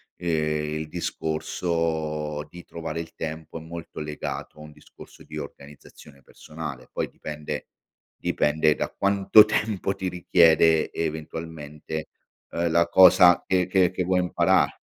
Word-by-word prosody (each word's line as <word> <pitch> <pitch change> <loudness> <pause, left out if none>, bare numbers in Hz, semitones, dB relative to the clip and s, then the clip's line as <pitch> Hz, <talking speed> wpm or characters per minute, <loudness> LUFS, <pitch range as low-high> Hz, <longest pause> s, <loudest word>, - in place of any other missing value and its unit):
ehm, 75 -2 -1
il 80 - -5
discorso 80 -2 -2
di 90 +1 -11
trovare 80 -1 -6
il 80 - -7
tempo 80 0 -6
è - - -8
molto 85 +1 -9
legato 75 0 -6
a - - -10
un 75 0 -11
discorso 75 - -16
di - - -9
organizzazione 70 0 -11
personale. 75 -1 -9
Poi - - -3
dipende 75 -1 -6 0.5
dipende 75 +1 +1
da - - -3
quanto 100 +2 +5
tempo 105 -2 -1
ti 95 - -4
richiede 80 -2 +4
eventualmente, 80 -1 -5 0.4
ehm, 85 0 -1
la 85 +1 +3
cosa 90 0 +7
che 90 -1 +2
che 95 -1 +3
che 90 0 -2
vuoi 90 +1 +1
imparar 90 -1 +2
80 Hz, 135 wpm, -25 LUFS, 75-90 Hz, 0.5 s, cosa